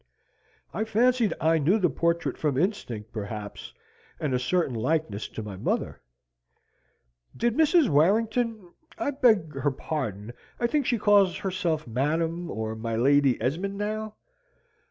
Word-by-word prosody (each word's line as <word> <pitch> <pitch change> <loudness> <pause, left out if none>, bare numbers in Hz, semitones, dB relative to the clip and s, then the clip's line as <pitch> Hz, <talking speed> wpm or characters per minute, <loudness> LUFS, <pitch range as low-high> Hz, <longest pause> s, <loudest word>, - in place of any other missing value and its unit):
"I 215 - -1
fancied 230 +1 +2
I 160 +1 +3
knew 165 +9 +3
the 185 -5 +3
portrait 170 +1 0
from 145 -4 -1
instinct, 125 - -2
perhaps, 105 -1 -6 0.5
and 150 -4 -1
a 125 - +2
certain 145 +2 0
likeness 115 -3 -1
to 110 - -7
my 105 -2 -7
mother." - - -2 1.4
"Did 235 0 +1
Mrs. 320 0 +4
Warrington 215 - +1 0.2
I 285 - -1
beg 220 - +3
her 145 - +2
pardon, 125 -7 -4 0.3
I 240 - +1
think 285 +2 +1
she 240 - +2
calls 205 -3 +4
herself 180 -5 -2
Madam 160 +8 -1
or 110 0 -4
my 115 0 -3
Lady 135 +2 +3
Esmond 190 +9 -2
now 215 +1 -3
165 Hz, 135 wpm, -26 LUFS, 130-215 Hz, 1.4 s, Mrs